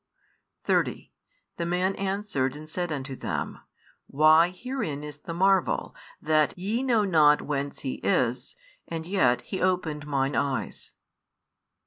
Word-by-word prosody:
30 - - 0 0.5
The 170 - -2
man 180 +2 +1
answered 195 -9 -2
and 155 +1 -10
said 175 +1 -3
unto 135 -2 -4
them, - - -4 0.5
Why, 155 +4 +5
herein 180 - -4
is 150 -1 -8
the 165 - -7
marvel, 190 0 +2 0.3
that 155 +1 +2
ye 210 +7 -1
know 240 -5 +2
not 150 -5 +5
whence 140 -1 -3
He 130 - -4
is, 120 - 0 0.3
and 165 -1 -5
yet 165 -10 +2
He 190 - -5
opened 165 -5 0
mine 140 -1 0
eyes. 140 -2 -2
155 Hz, 130 wpm, -27 LUFS, 145-185 Hz, 0.5 s, Why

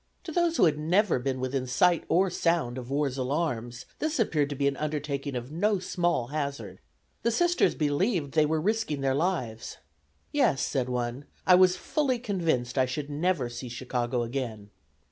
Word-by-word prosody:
To 345 - -6
those 340 0 +1
who - - +6
had 150 -2 +2
never 175 - +2
been 130 +1 -2
within 130 0 -2
sight 170 +7 +3
or 185 +1 +3
sound 165 -9 0
of 125 0 -9
"war's 140 -1 -1
alarms," 125 -4 -2
this 310 -2 -1
appeared 150 -10 +1
to 145 - -4
be 140 +1 +1
an 140 - 0
undertaking 145 -2 -3
of 125 +2 -5
no 205 +6 +1
small 175 -8 -1
hazard. 140 -10 -4 0.4
The 235 - +2
Sisters 345 +9 +2
believed 150 - 0
they 155 0 +3
were 160 +1 +1
risking 200 -5 -1
their 135 -1 +1
lives. 135 -8 -2 0.5
"Yes," 135 - +2
said 130 -3 -1
one, 125 +2 -3 0.2
"I 185 - +6
was 185 0 +6
fully 270 +3 0
convinced 165 - -1
I 130 - +3
should 145 +3 -4
never 155 -3 0
see 120 +1 -7
Chicago 120 0 -2
again." 115 -5 -5
145 Hz, 175 wpm, -28 LUFS, 125-180 Hz, 0.5 s, who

